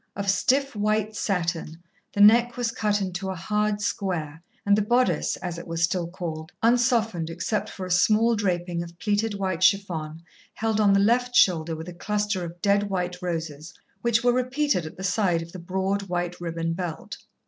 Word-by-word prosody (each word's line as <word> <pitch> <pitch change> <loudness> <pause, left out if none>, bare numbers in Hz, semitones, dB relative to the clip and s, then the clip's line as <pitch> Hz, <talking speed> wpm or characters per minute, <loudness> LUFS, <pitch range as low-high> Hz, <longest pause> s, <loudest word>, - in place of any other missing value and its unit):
Of 200 -1 +1
stiff 275 +5 +1
white 215 +1 0
satin, 170 -5 -2 0.4
the 205 - +1
neck 235 +4 +6
was 240 -2 0
cut 210 -3 0
into 190 0 -3
a 190 - -3
hard 210 +3 -1
square, 170 -7 -3 0.2
and 200 0 +5
the 210 - +2
bodice, 240 +4 +1
as 175 -2 -5
it - - -10
was 165 0 -2
still 170 0 +1
called, 165 -2 -6
unsoftened 230 -7 +2
except 175 +6 -2
for 190 - -7
a 185 - -6
small 215 +6 +4
draping 175 -4 -1
of 170 0 -9
pleated 210 +2 0
white 190 -3 -2
chiffon 170 -5 +1 0.3
held 220 -1 0
on 200 -2 +5
the 195 - +4
left 245 +4 +2
shoulder 165 -6 +4
with 160 +2 -8
a 180 - -7
cluster 205 +1 -2
of 170 0 -9
dead 200 0 +2
white 180 -1 -3
roses, 160 -3 -5 0.3
which 235 -1 +2
were 245 0 +4
repeated 255 - 0
at 155 - -11
the 190 - -7
side 185 -4 +1
of 165 - -12
the 185 - -8
broad, 190 +3 -1
white 175 0 -3
ribbon 165 -1 -2
belt. 170 -2 -5
190 Hz, 185 wpm, -25 LUFS, 170-215 Hz, 0.4 s, neck